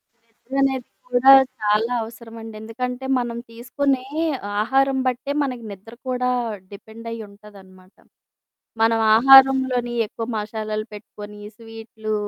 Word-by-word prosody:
నిద్ర 230 +2 -20
అనేది 265 -2 0 0.2
కూడా 250 +2 +5 0.3
చాలా 215 +3 +1
అవసరమండి. 225 -1 -10
ఎందుకంటే 250 +3 -5
మనం 235 -1 -4
తీసుకునే 255 +3 -2 0.6
ఆహారం 270 +3 +2
బట్టే 255 +3 -2
మనకి 250 -4 -4
నిద్ర 200 +4 -12 0.2
కూడా 250 0 0 0.4
డిపెండయ్యి 230 +2 -9
ఉంటాదనమాట. 195 -2 -17 0.9
మనం 225 0 +3 0.2
ఆహారంలోని 260 -1 +5
ఎక్కువ 225 +2 -6
మసాలాలు 215 0 -4
పెట్టుకొని, 210 0 -11 0.2
స్వీట్లు, 225 -1 -7
230 Hz, 105 wpm, -22 LUFS, 215-250 Hz, 0.9 s, కూడా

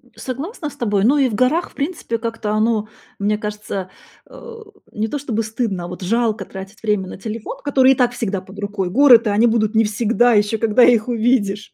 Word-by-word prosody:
Согласна 295 - -6
с - - -14
тобой. 205 -4 0
Ну 280 +5 +4
и 270 -2 +3
в - - -6
горах, 255 +10 +1
в - - -24
принципе, 280 -6 -3
как-то 225 -2 -4
оно, 215 0 +1 0.3
мне 210 +1 0
кажется, 210 -3 -5 0.4
а, 470 -2 -11 0.3
не 215 +1 -2
то 290 - -3
чтобы 235 -6 -2
стыдно, 215 -5 -3
а, - - -6
вот, 180 +1 -9
жалко 220 -1 0
тратить 195 +3 -10
время 210 -3 0
на - - -8
телефон, 220 +2 -6
который 270 -2 +4
и - - -4
так 245 -1 +2
всегда 205 -5 -3
под 195 +2 -13
рукой. 200 -2 -3
Горы-то, 240 -2 +5
они 220 +4 +3
будут 220 -1 +1
не 225 - +5
всегда, 230 +3 +2
еще 210 +1 +2
когда 225 +2 +3
их 235 -1 +4
увидишь. 220 -4 0
225 Hz, 205 wpm, -19 LUFS, 210-245 Hz, 0.4 s, Горы-то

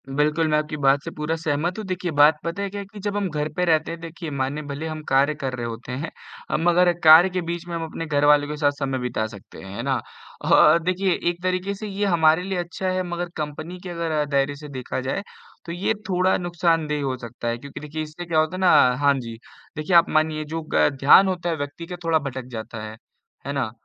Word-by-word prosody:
बिल्कुल, 150 +3 +1
मैं 150 0 +2
आपकी 150 0 -2
बात 135 +1 +4
से - - -6
पूरा 150 +2 -1
सहमत 160 +3 -1
हूँ। 215 - -5
देखिए 185 -2 -3
बात 145 +1 +5
पता 170 +4 -3
है 200 - -2
क्या 205 +1 -6
है - - -8
कि 210 - -9
जब 205 +1 -2
हम 200 -2 -1
घर 150 -1 -2
पे 180 - +1
रहते 160 -2 +2
हैं, 170 - -6
देखिए 165 0 -7
मानिए 140 +2 -2
भले 145 +3 -4
हम 155 -1 -5
कार्य 140 +3 +3
कर 135 -3 -4
रहे 120 -1 -4
होते 115 +2 -6
हैं 135 +6 -4 0.4
अ, - - +1
मगर 175 +1 +4
कार्य 160 +4 +9
के 185 0 -2
बीच 170 0 -4
में 170 - -4
हम 165 - -3
अपने 165 +1 -6
घर 145 -2 +1
वालों 145 0 +5
के 150 0 -5
साथ 145 -1 +3
समय 135 -2 -1
बिता 125 -3 -2
सकते 100 -3 -13
हैं, 95 +1 -9
है 115 - -4
ना? 135 -2 0 0.5
और 170 - +6
देखिए 185 +1 +1 0.2
एक 175 0 -5
तरीके 185 +2 -1
से 215 +2 -6
ये 200 0 -2
हमारे 165 -2 +4
लिए 190 0 -3
अच्छा 175 +2 -4
है 185 0 0
मगर 175 0 -3
कंपनी 155 +3 -5
के 185 - -6
अगर 165 -3 -1
दायरे 140 0 +1
से 150 +1 -10
देखा 130 -2 -4
जाए, 135 +9 -2 0.4
तो 170 - -6
ये 180 +5 0 0.2
थोड़ा 185 0 +2
नुकसानदेह 165 -4 0
हो 130 -2 -1
सकता 120 0 -7
है 115 0 -1
क्योंकि 140 +3 -9
देखिए 150 +1 -5
इससे 155 +3 -8
क्या 165 -2 +1
होता 155 +4 0
ना 185 -1 +4 0.3
हाँ 140 0 +5
जी, 115 -2 -7 0.4
देखिए 155 +4 0
आप 170 0 +6
मानिए 155 0 +1
जो 165 - -2
ग - - +4
ध्यान 145 +8 +7
होता 180 -2 -2
है 165 - 0
व्यक्ति 145 +3 -6
का 180 - -5
थोड़ा 165 -1 +2
भटक 130 -3 -5
जाता 110 -1 -6
है, 110 0 -8 0.5
है 140 - -2
ना? 130 -6 -1
155 Hz, 245 wpm, -23 LUFS, 140-175 Hz, 0.5 s, कार्य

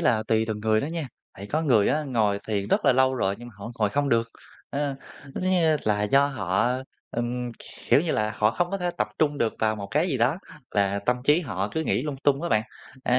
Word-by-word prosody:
là 110 -2 +2
tùy 110 0 +1
từng 110 -1 -3
người 110 0 +2
đó - - -2
nha, 165 -3 -3 0.3
tại 100 - -8
có 155 +8 -1
người 115 -9 +4
á 155 - +1
ngồi 110 -6 +1
thiền 100 -1 -1
rất - - +2
là - - +6
lâu 130 +1 +3
rồi 100 -6 0
nhưng 120 +1 -9
mà 115 - -15
họ 115 +4 -7
ngồi 105 -2 +2
không 145 +5 0
được, 115 -1 +2 0.4
à, 140 -1 -1 0.3
cứ 135 - -7
kiểu 185 0 0
như 165 -4 +3
là, 105 -1 +1
do 135 +7 +4
họ, 110 +1 0 0.3
ừm, 120 +1 -2 0.4
kiểu - - +7
như 165 0 -1
là, 110 0 0
họ 110 0 +3
không 175 +8 -1
có 195 - -2
thể 180 -1 -1
tập - - +1
trung 145 -2 +1
được 115 - +1
vào 110 0 +1
một 100 -1 -5
cái 155 +8 +2
gì 135 - 0
đó, 125 +8 +2 0.4
và 100 0 +2
tâm 125 0 +3
trí 150 +4 +4
họ 105 - -3
cứ 160 - -1
nghĩ - - +1
lung 145 -2 -3
tung 145 +2 +3
á - - -1
bạn. 110 -1 +3 0.4
À, 125 +1 +3
120 Hz, 255 wpm, -26 LUFS, 110-145 Hz, 0.4 s, kiểu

